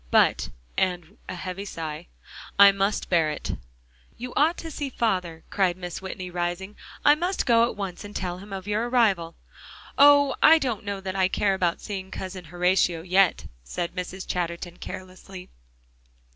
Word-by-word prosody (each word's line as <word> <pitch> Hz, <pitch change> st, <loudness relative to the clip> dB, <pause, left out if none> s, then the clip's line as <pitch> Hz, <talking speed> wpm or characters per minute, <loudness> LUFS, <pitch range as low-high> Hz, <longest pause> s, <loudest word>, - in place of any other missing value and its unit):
But," -, -, +3 dB, 0.3 s
and 180 Hz, 0 st, -2 dB
a -, -, -4 dB
heavy 185 Hz, +2 st, -5 dB
sigh, 160 Hz, -6 st, -6 dB, 0.5 s
"I 200 Hz, 0 st, +9 dB
must 195 Hz, +1 st, -1 dB
bear 165 Hz, -3 st, +3 dB
it." 150 Hz, -, -4 dB, 0.6 s
"You 245 Hz, +1 st, -6 dB
ought 320 Hz, +4 st, +3 dB
to 325 Hz, -, -7 dB
see 290 Hz, -2 st, -4 dB
father," 180 Hz, -10 st, -1 dB
cried 185 Hz, -3 st, +1 dB
Mrs. 180 Hz, -1 st, -6 dB
Whitney, 185 Hz, -1 st, -6 dB
rising. 175 Hz, +3 st, -3 dB, 0.3 s
"I 290 Hz, -, +8 dB
must 355 Hz, +5 st, -1 dB
go 235 Hz, -2 st, +4 dB
at -, -, -7 dB
once 195 Hz, -3 st, -5 dB
and 205 Hz, 0 st, -10 dB
tell 180 Hz, -1 st, -3 dB
him 200 Hz, +2 st, -12 dB
of 190 Hz, -1 st, -5 dB
your 215 Hz, +3 st, 0 dB
arrival." 200 Hz, -9 st, +2 dB, 0.6 s
"Oh! 285 Hz, -1 st, +7 dB
I 325 Hz, -, +8 dB
don't 250 Hz, -9 st, -2 dB
know 200 Hz, -1 st, -3 dB
that 190 Hz, 0 st, -4 dB
I 190 Hz, -1 st, +3 dB
care 195 Hz, +1 st, +1 dB
about 180 Hz, -3 st, 0 dB
seeing 190 Hz, -2 st, -5 dB
Cousin 185 Hz, -2 st, -7 dB
Horatio 175 Hz, 0 st, +1 dB
yet," 185 Hz, 0 st, +3 dB, 0.2 s
said 170 Hz, -, -4 dB
Mrs. 185 Hz, +1 st, -5 dB
Chatterton 175 Hz, 0 st, -3 dB
carelessly. 185 Hz, 0 st, -9 dB
190 Hz, 165 wpm, -25 LUFS, 175-210 Hz, 0.6 s, I